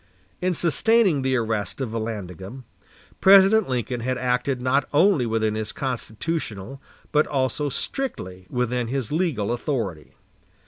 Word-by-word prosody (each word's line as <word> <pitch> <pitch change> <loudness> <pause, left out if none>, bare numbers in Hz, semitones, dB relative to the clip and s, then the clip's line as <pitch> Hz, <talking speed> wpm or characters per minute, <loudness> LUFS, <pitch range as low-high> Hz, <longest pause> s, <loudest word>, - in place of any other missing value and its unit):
In 180 0 +1
sustaining 175 - +3
the 130 0 +1
arrest 110 -2 -2
of 130 -5 -3
Vallandigham, 110 0 -5 0.6
President 195 +1 +6
Lincoln 125 -1 -2
had 125 +2 -2
acted 125 +1 0
not 130 +2 +1
only 150 -4 +4
within 110 -1 0
his 110 0 -3
constitutional, 130 - -4 0.3
but 150 0 +3
also 140 +1 0
strictly 95 - -5
within 125 -1 -1
his 130 -1 -3
legal, 150 - 0
authority. 115 - -3
125 Hz, 125 wpm, -24 LUFS, 110-150 Hz, 0.6 s, President